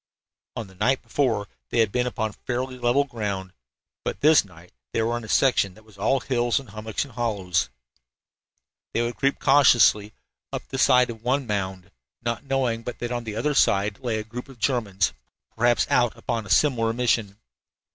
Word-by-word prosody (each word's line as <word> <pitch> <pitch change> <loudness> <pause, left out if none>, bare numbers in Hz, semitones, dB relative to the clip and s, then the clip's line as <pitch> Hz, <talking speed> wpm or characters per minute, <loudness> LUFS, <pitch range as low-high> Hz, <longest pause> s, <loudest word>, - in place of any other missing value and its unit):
On 115 - -4
the 95 - -16
night 125 +8 +1
before 115 -8 0 0.2
they - - -2
had 110 -3 +3
been 125 +2 0
upon 110 -4 -2
fairly 125 +3 -4
level 120 +4 +3
ground, 100 -8 -4 0.5
but - - -4
this 155 +1 +6
night 90 -3 -17 0.2
they 115 - +1
were 115 +1 0
in 120 - -4
a - - -8
section 100 -8 +3
that 110 - -18
was 110 -2 -19
all 115 +7 +1
hills 120 -2 +1
and 135 - -12
hummocks 110 +4 -3
and 135 - -15
hollows. 95 - -1 1.3
They 115 - +2
would 120 +1 -3
creep 135 0 +1
cautiously 120 -6 +5 0.4
up - - -5
the 135 - -4
side 125 -2 +5
of 115 -1 -11
one 130 +3 0
mound, 95 -4 -3 0.3
not 115 -1 -2
knowing 130 -4 0
but 120 +1 -6
that 120 0 -4
on 120 -1 -3
the 110 -2 -5
other 145 +7 0
side 100 -5 +2
lay 120 -4 -2
a 110 - -3
group 120 +5 -8
of 135 - -13
Germans, 105 -6 0 0.4
perhaps 120 +1 +3
out 120 -3 +2
upon 115 -2 -3
a - - -12
similar 115 -5 +3
mission. 115 -4 0
115 Hz, 185 wpm, -24 LUFS, 105-125 Hz, 1.3 s, this